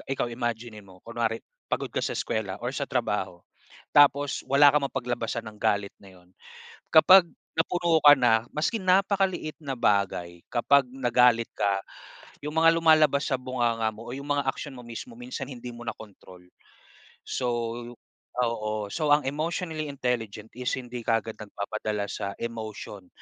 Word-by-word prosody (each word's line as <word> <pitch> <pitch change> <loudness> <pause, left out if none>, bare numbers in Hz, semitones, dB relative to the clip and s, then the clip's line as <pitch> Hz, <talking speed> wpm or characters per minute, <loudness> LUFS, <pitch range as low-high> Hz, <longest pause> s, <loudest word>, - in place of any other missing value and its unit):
ikaw 125 - -1
imaginin 115 -3 -4
mo. 95 -1 -16
Kunwari 115 -1 -2 0.3
pagod - - -1
ka - - 0
sa - - -1
eskuwela 100 -4 -2
or 120 - -1
sa 140 - -2
trabaho, 105 -8 -2 0.5
tapos 145 -1 +4
wala 140 +1 +6
kang 150 -1 +2
mapaglabasan 120 -3 -3
ng 105 - -18
galit 100 -1 +1
na 95 -2 -16
'yon. 90 0 -25 0.6
Kapag 185 +3 +8 0.3
napuno 170 0 +2
ka 145 -1 +10
na 115 -2 +3
maski 160 +9 0
napakaliit 190 -3 +1
na 140 -3 -4
bagay, 95 -6 0
kapag 135 +3 +4
nagalit 125 -2 +3
ka, 100 -1 +1 0.6
'yong 150 +1 -4
mga 165 0 +7
lumalabas 155 -3 +4
sa 130 - +2
bunganga 120 -3 0
mo 115 +2 -10
o - - -5
'yong 140 +1 -8
mga 145 -1 0
aksyon 140 -1 -8
mo 125 - -10
mismo, 175 - -8
minsan 245 - -6
hindi 125 -2 -8
mo 120 0 -10
na - - -3
control. 95 -4 -14 0.8
So 125 - -2 0.9
oo, 110 -3 -1
so 155 - -1
ang 150 - -6
emotionally 155 +1 -3
intelligent 115 -5 -3
is 125 0 -2
hindi 125 -1 -6
kaagad 115 -1 0
nagpapadala 105 0 -4
sa 100 0 -4
emotion 110 -4 -7
120 Hz, 155 wpm, -27 LUFS, 110-145 Hz, 0.9 s, ka